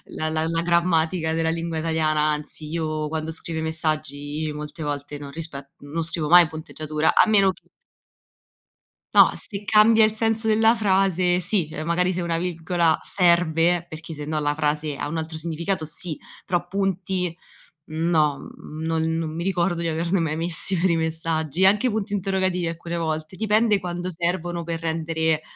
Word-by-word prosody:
la 155 Hz, 0 st, -1 dB
la 160 Hz, 0 st, 0 dB
la 165 Hz, 0 st, 0 dB
grammatica 170 Hz, -1 st, +1 dB
della 160 Hz, 0 st, 0 dB
lingua 165 Hz, 0 st, -3 dB
italiana, 155 Hz, -1 st, +1 dB
anzi, 150 Hz, 0 st, -2 dB
io 155 Hz, -2 st, -3 dB
quando 160 Hz, 0 st, -3 dB
scrivo 160 Hz, 0 st, -3 dB
i -, -, -3 dB
messaggi 155 Hz, -1 st, -2 dB
molte 150 Hz, +1 st, -8 dB
volte 145 Hz, 0 st, -4 dB
non 140 Hz, -1 st, -9 dB
rispe 140 Hz, -3 st, -7 dB
non 155 Hz, +3 st, -4 dB
scrivo 160 Hz, -2 st, -2 dB
mai 175 Hz, -1 st, +8 dB
punteggiatura, 155 Hz, 0 st, -2 dB
a -, -, +5 dB
meno 195 Hz, -3 st, +4 dB
che -, -, -19 dB, 1.5 s
No, -, -, +8 dB
se 205 Hz, -1 st, -1 dB
cambia 215 Hz, +1 st, +6 dB
il 215 Hz, -, +1 dB
senso 225 Hz, 0 st, +1 dB
della 220 Hz, +2 st, +4 dB
frase, 190 Hz, -4 st, +2 dB
sì, 180 Hz, -2 st, +1 dB
cioè 155 Hz, -, -5 dB
magari 180 Hz, +3 st, +1 dB
se 180 Hz, -, -3 dB
una 165 Hz, -1 st, -1 dB
virgola 170 Hz, -1 st, +1 dB
serve 170 Hz, -1 st, +3 dB
perché 160 Hz, 0 st, -9 dB
sennò 150 Hz, +1 st, -3 dB
la 145 Hz, 0 st, 0 dB
frase 150 Hz, -1 st, -1 dB
ha -, -, -4 dB
un 165 Hz, +2 st, -4 dB
altro 160 Hz, 0 st, -4 dB
significato 165 Hz, +1 st, -2 dB
sì, 160 Hz, 0 st, -4 dB, 0.3 s
però 175 Hz, -1 st, -1 dB
punti 185 Hz, -2 st, -2 dB, 0.5 s
no, 155 Hz, -2 st, 0 dB
non 160 Hz, +1 st, -3 dB
non 160 Hz, -1 st, -3 dB
mi 170 Hz, -, -3 dB
ricordo 175 Hz, -2 st, 0 dB
di -, -, 0 dB
averne 170 Hz, +3 st, 0 dB
mai 155 Hz, -2 st, -1 dB
messi 170 Hz, +3 st, +3 dB
per 185 Hz, +1 st, +2 dB
i 170 Hz, -, +2 dB
messaggi, 160 Hz, 0 st, -1 dB
anche 210 Hz, +5 st, +4 dB
punti 205 Hz, -1 st, -3 dB
interrogativi 190 Hz, -2 st, 0 dB
alcune 170 Hz, +1 st, -5 dB
volte 160 Hz, +1 st, -3 dB
dipende, 215 Hz, 0 st, +2 dB
quando 175 Hz, 0 st, -4 dB
servono 175 Hz, 0 st, -2 dB
per 165 Hz, 0 st, -4 dB
rendere, 160 Hz, -1 st, -1 dB
165 Hz, 165 wpm, -23 LUFS, 155-180 Hz, 1.5 s, mai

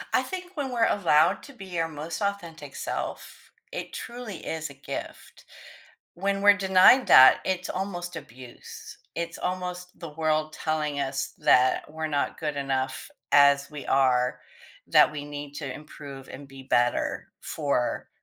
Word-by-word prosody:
I -, -, +4 dB
think 365 Hz, -1 st, -7 dB
when 275 Hz, -3 st, -3 dB
we're 230 Hz, -2 st, +2 dB
allowed 170 Hz, -1 st, +3 dB
to 280 Hz, -, -12 dB
be 190 Hz, -6 st, -6 dB
our 165 Hz, -, +1 dB
most 160 Hz, +6 st, -6 dB
authentic 170 Hz, -8 st, -4 dB
self, -, -, -6 dB, 0.2 s
it -, -, -6 dB
truly 235 Hz, -6 st, -7 dB
is 160 Hz, -2 st, -4 dB
a 140 Hz, -, -13 dB
gift. 135 Hz, -, -8 dB, 0.7 s
When 195 Hz, +2 st, -1 dB
we're 205 Hz, 0 st, +7 dB
denied 190 Hz, +7 st, +6 dB
that, 130 Hz, 0 st, +9 dB
it's 185 Hz, -1 st, -2 dB
almost 180 Hz, -2 st, -4 dB
abuse. 125 Hz, 0 st, -11 dB, 0.2 s
It's 170 Hz, 0 st, -4 dB
almost 180 Hz, 0 st, -5 dB
the 165 Hz, -, -6 dB
world 155 Hz, 0 st, -1 dB
telling 150 Hz, -2 st, -2 dB
us 135 Hz, -1 st, -3 dB
that 130 Hz, +1 st, +4 dB
we're 160 Hz, 0 st, -3 dB
not 145 Hz, +2 st, -2 dB
good 150 Hz, -2 st, -2 dB
enough 135 Hz, -1 st, -2 dB, 0.2 s
as 140 Hz, 0 st, +5 dB
we 150 Hz, -2 st, -8 dB
are, 125 Hz, -2 st, +2 dB, 0.5 s
that -, -, +6 dB
we 145 Hz, -1 st, -5 dB
need 145 Hz, -1 st, -7 dB
to 140 Hz, -4 st, -5 dB
improve 140 Hz, -2 st, -10 dB
and 140 Hz, +1 st, -10 dB
be 135 Hz, -1 st, -12 dB
better 120 Hz, -1 st, 0 dB
for 140 Hz, -5 st, -2 dB
155 Hz, 150 wpm, -26 LUFS, 140-185 Hz, 0.7 s, that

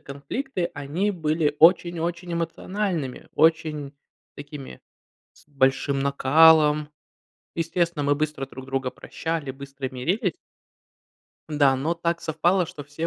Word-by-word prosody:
конфликты, 175 Hz, -, -4 dB
они 150 Hz, +9 st, -1 dB
были 155 Hz, -4 st, 0 dB
очень-очень 170 Hz, +1 st, +3 dB
эмоциональными, 170 Hz, -2 st, -3 dB
очень 155 Hz, -3 st, +2 dB, 0.4 s
такими 145 Hz, -1 st, -9 dB, 0.5 s
с -, -, -23 dB
большим 135 Hz, 0 st, +1 dB
накалом. 150 Hz, +2 st, +5 dB, 0.7 s
Естественно, 165 Hz, -2 st, -1 dB
мы 145 Hz, -, +3 dB
быстро 150 Hz, -2 st, -2 dB
друг 130 Hz, 0 st, -10 dB
друга 135 Hz, -1 st, -2 dB
прощали, 160 Hz, -4 st, -4 dB
быстро 135 Hz, 0 st, -7 dB
мирились. 170 Hz, -, -1 dB, 1.1 s
Да, 145 Hz, -3 st, +3 dB
но 155 Hz, +6 st, -1 dB
так 170 Hz, 0 st, -1 dB
совпало, 175 Hz, +4 st, +1 dB
что 145 Hz, -2 st, -9 dB
все 150 Hz, +3 st, -4 dB
155 Hz, 110 wpm, -24 LUFS, 140-170 Hz, 1.1 s, накалом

